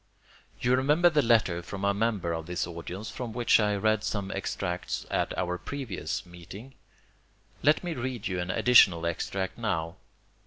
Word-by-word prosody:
You 125 +1 +3
remember 150 +7 +4
the 150 -1 +3
letter 110 -8 +3
from 95 +3 -5
a 100 - +3
member 100 -5 0
of 80 0 -5
this 90 0 -2
audience 90 +5 -7
from 115 0 -6
which 120 0 +4
I 105 -1 +2
read 110 +1 +1
some 100 -2 -2
extracts 90 -2 -3
at - - 0
our 90 0 -1
previous 110 - -4
meeting. 90 +9 -11 0.9
Let 150 +6 +3
me 175 -2 -2
read 125 -4 -4
you 90 -2 -2
an 90 +1 -3
additional 95 -7 +5
extract 95 +4 -3
now. 85 -7 -2
100 Hz, 160 wpm, -28 LUFS, 90-120 Hz, 0.9 s, additional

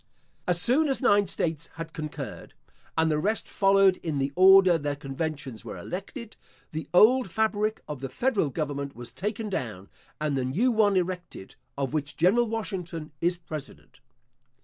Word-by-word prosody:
As 175 -1 +2
soon 265 - +3
as 270 0 0
nine 205 -3 +4
states 160 -1 -2
had 165 0 -7
concurred 155 -2 -7 0.4
(and 160 0 +3
the 150 - +1
rest 215 +7 0
followed 195 -1 +4
in 155 -4 -3
the 135 0 0
order 190 -2 +7
their 145 -1 -2
conventions 140 -3 -5
were 110 - -7
elected), 210 +5 -7 0.3
the 155 +1 -5
old 220 +5 +5
fabric 215 +2 0
of 150 -3 -5
the 135 - -4
federal 210 - 0
government 140 -1 -4
was 120 0 -9
taken 210 +2 -3
down, 110 - -4 0.3
and 150 -2 -1
the 130 - 0
new 185 - +1
one 210 -4 +3
erected, 180 - -4 0.2
of 140 0 -2
which 145 -2 -3
General 215 +8 +4
Washington 180 -8 -4
is 175 +1 +2
president. 155 -6 -9
170 Hz, 160 wpm, -27 LUFS, 145-205 Hz, 0.4 s, order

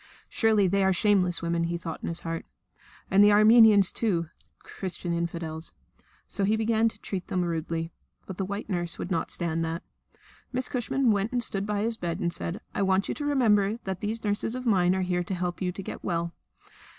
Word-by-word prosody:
"Surely 220 -3 +3
they 195 +2 +2
are 190 - +4
shameless 185 -2 +2
women," 170 0 0
he 170 0 -2
thought 165 -1 -6
in - - -3
his 170 - -2
heart. 165 0 -5 0.6
"And 195 +1 +6
they 205 - +7
are 205 - +5
Armenians 215 -2 +7
too 170 -8 -1 0.3
Christian 180 -2 -5
infidels!" 170 -1 -4 0.5
So 200 - -2
he 210 +3 +3
began 225 0 +2
to - - -15
treat 185 -3 -5
them 180 -1 0
rudely. 165 0 -3 0.3
But 190 - -8
the 195 - -1
white 200 +2 -5
nurse 175 -4 -2
would 180 - -5
not 165 - -1
stand 165 -1 -1
that. 165 +1 -3 0.7
Miss 255 0 -2
Cushman 250 0 +1
went 205 +1 0
and 245 -1 +2
stood 200 -2 -2
by 210 -1 -1
his 225 0 0
bed 170 -4 -3
and 170 0 -1
said: 175 +5 -4
"I - - -1
want 190 0 +2
you - - 0
to 290 - -5
remember 220 -7 +3
that 190 -2 -4
these 220 +2 -3
nurses 205 +3 -1
of 255 0 -5
mine 185 -5 +3
are 190 - 0
here 180 -1 0
to 185 +2 -4
help 180 0 -3
you 180 -1 0
to 195 +2 -7
get - - -7
well. 170 -1 -2
190 Hz, 210 wpm, -27 LUFS, 170-215 Hz, 0.7 s, they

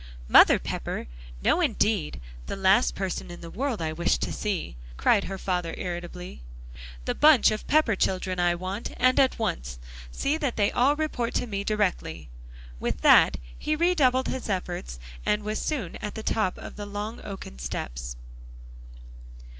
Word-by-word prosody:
"Mother - - +8
Pepper? - - -4 0.4
No, - - +3
indeed; 205 -8 +1 0.3
the - - -3
last 195 +5 +3
person 190 -2 -3
in 175 - -9
the 170 -1 -9
world 245 -6 -2
I 155 0 -2
wish 170 +2 +1
to - - -3
see," 195 - -3 0.2
cried 200 - +3
her 195 - -5
father 180 -3 -2
irritably. 175 - -6 0.6
"The - - 0
bunch 300 -8 +6
of 215 - -4
Pepper 295 -8 +3
children, 185 -1 -1
I 175 0 +3
want, 185 +5 -5
and 255 +1 +4
at 265 -1 +3
once; 60 - -3 0.3
see 290 - 0
that 280 -6 -1
they 205 -2 +2
all 270 +4 +3
report 295 -6 -2
to - - +1
me 200 -4 -3
directly." 180 - -1 0.5
With - - -2
that - - +6 0.2
he 305 - -1
redoubled 300 -7 +3
his 260 -3 -4
efforts 175 - -3 0.3
and 210 0 +1
was 215 +1 -2
soon 255 - -3
at 210 - -6
the 220 - -5
top 215 -5 0
of - - -9
the 205 -1 -6
long 205 +3 -5
oaken 195 - -8
steps. - - -5
200 Hz, 160 wpm, -26 LUFS, 175-240 Hz, 0.6 s, Mother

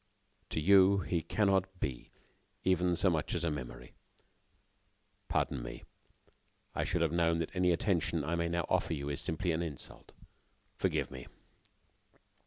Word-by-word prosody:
To - - -1
you, 95 +3 +6
he 85 -3 -1
cannot 95 -1 +1
be 65 -6 -4 0.5
even 90 -1 +2
so 95 - +1
much 80 -2 -1
as 85 - -1
a 85 - +1
memory. 65 -5 -7 1.3
Pardon 65 - 0
me....I - - -10
should - - 0
have - - +1
known 85 -1 +2
that 85 +2 -3
any 90 -1 +3
attention 85 -3 +1
I 80 +4 -2
may 85 0 0
now 85 0 0
offer - - +1
you 70 -1 -4
is 70 - -2
simply 85 +2 -1
an 80 +1 0
insult. 80 -6 -8 0.6
Forgive - - 0
me." 65 -2 -8
85 Hz, 145 wpm, -33 LUFS, 75-90 Hz, 1.3 s, you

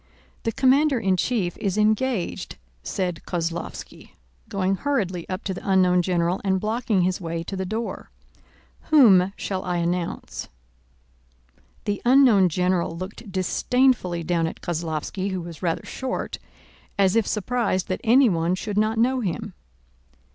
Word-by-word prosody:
"The 225 - +1
commander 270 +3 +3
in 190 -4 +2
chief 185 -3 -1
is 200 -1 -1
engaged," 215 -1 0 0.2
said 180 -4 -3
Kozlóvski, 170 -1 -5 0.4
going 195 -2 0
hurriedly 190 -12 -2
up 185 +2 -4
to 190 - -2
the 180 - -7
unknown 180 -2 +4
general 175 0 0
and 190 -1 +1
blocking 215 -2 0
his 185 +1 0
way 165 -1 -3
to 195 - -6
the 190 -1 -3
door. 225 +4 -4 0.8
"Whom 195 -11 +6
shall 190 -2 -3
I 180 -1 -1
announce?" 170 0 -3 1.4
The 205 -2 -2
unknown 240 -7 +6
general 180 -1 0
looked 190 +3 -8
disdainfully 190 -1 +1
down 165 -1 0
at - - -7
Kozlóvski, 170 +3 -3
who 185 -2 -3
was 170 -2 -9
rather 170 -3 -1
short, 260 -1 -4 0.6
as 195 -1 +3
if 225 -2 +2
surprised 215 -3 -1
that 185 - -2
anyone 205 -9 +4
should 205 +2 -2
not 215 +1 +1
know 255 +3 +2
him. 210 -1 -3
190 Hz, 140 wpm, -24 LUFS, 180-225 Hz, 1.4 s, Whom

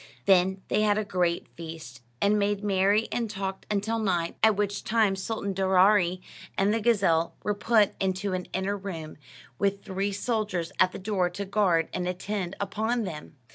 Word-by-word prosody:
Then 190 0 +3
they - - +1
had 210 -1 +3
a 215 - -1
great 175 -3 0
feast, 160 -7 -9 0.2
and 210 +1 +3
made 205 0 0
merry 200 +2 +2
and 230 -2 -1
talked 195 -1 -5
until 210 +2 0
night, 175 -6 0
at 220 -1 +5
which 205 0 -1
time 215 -3 +2
Sultan 200 0 -3
Daaraaee 190 -1 +3 0.4
and 200 +2 +3
the 225 - 0
gazelle 195 -8 +2
were 210 - 0
put 210 0 +3
into 190 +1 -1
an 180 -1 -3
inner 190 +2 -1
room, 175 -6 -7 0.4
with 200 0 0
three 195 +2 -2
soldiers 200 -5 -2
at 185 0 +5
the - - -7
door 190 -2 0
to 200 +3 -5
guard 190 -5 +2
and 180 -1 -2
attend 185 0 -3
upon 220 +4 -1
them. 150 -6 -7
195 Hz, 175 wpm, -27 LUFS, 185-210 Hz, 0.4 s, at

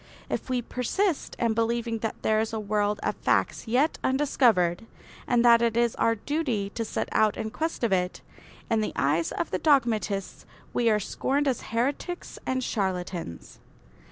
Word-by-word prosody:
If - - -3
we 250 -1 0
persist 305 - -1
in 230 -2 +1
believing 230 0 0
that 220 0 -3
there 215 0 +3
is 220 +1 -1
a 220 - -1
world 210 0 0
of - - 0
facts - - 0
yet 260 +8 +2
undiscovered 225 -9 +2 0.4
and 245 -1 +3
that 235 -1 +7
it 230 -1 +1
is 235 -1 +3
our 230 - +2
duty 230 -5 -2
to 230 - -3
set 220 - -3
out 215 -1 +2
in 220 0 -3
quest 320 -1 -3
of 225 -4 +2
it, 180 0 -1 0.5
in 225 -2 +1
the 215 - -2
eyes 155 +4 +1
of 170 - -3
the 185 - -1
dogmatists 225 -9 +1 0.3
we 235 -1 +2
are 210 -1 +3
scorned 280 +7 -1
as 260 -4 0
heretics 275 +10 -3
and 260 0 0
charlatans. 180 - -3
230 Hz, 170 wpm, -27 LUFS, 205-250 Hz, 0.5 s, that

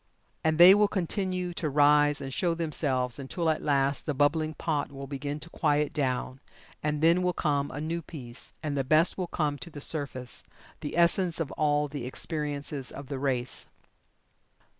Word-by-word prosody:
And 160 -1 +2
they 175 +3 +10
will 205 +1 +4
continue 185 -2 -2
to 160 -2 -2
rise 145 +1 +4
and 135 -1 -5
show 170 +2 +1
themselves 140 -6 -1
until 160 +5 -1
at 155 - -2
last 140 0 +1
the 150 - -1
bubbling 155 +3 +1
pot 150 -3 -2
will 140 0 -7
begin 145 +2 -4
to 170 - -7
quiet 150 -2 +1
down, 130 -2 -1 0.4
and 150 0 -1
then 170 +2 +5
will 180 0 +1
come 145 -4 0
a 145 - -6
new 165 +3 -2
peace, 125 -7 -9
and 150 -2 -2
the 135 - +1
best 155 +6 +4
will 185 -2 -3
come 150 -4 -1
to 170 - -8
the 150 - -9
surface 135 -5 -2 0.4
the 150 - -5
essence 170 0 +3
of 160 -4 -2
all 150 -1 +1
the 140 -3 -5
experiences 145 -1 -3
of 140 -1 -9
the 140 -2 -3
race. 130 -2 -2
150 Hz, 180 wpm, -28 LUFS, 140-165 Hz, 0.4 s, they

